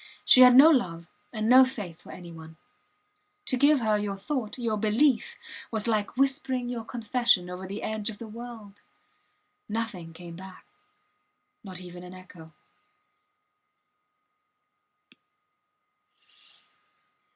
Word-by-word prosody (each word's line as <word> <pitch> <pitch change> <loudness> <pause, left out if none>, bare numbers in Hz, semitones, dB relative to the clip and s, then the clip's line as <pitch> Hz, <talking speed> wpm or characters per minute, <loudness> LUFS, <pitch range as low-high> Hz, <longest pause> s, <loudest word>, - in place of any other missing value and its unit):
She 255 - +7
had 250 -1 +8
no 295 +5 +9
love 170 - -1 0.2
and 215 -1 -3
no 255 +2 +8
faith 205 -10 -6
for - - -13
any 175 -1 -11
one. 160 -1 -13 0.9
To 260 - +1
give 285 +1 +3
her 215 -2 +1
your 200 -1 -4
thought, 220 +1 -4
your 230 -3 -2
belief, 225 +5 +1 0.3
was 220 0 -2
like 215 0 -1
whispering 260 -2 0
your 240 -2 -5
confession 230 -5 0
over 185 +1 -7
the 200 +2 -7
edge 215 0 -3
of 210 - -8
the 230 - -9
world. 220 -3 -11 0.9
Nothing 210 -7 -4
came 170 0 -11
back 190 0 -12 1.0
not 185 -3 -8
even 180 -1 -10
an 180 +1 -11
echo. 175 -3 -14
215 Hz, 120 wpm, -27 LUFS, 185-245 Hz, 1.0 s, no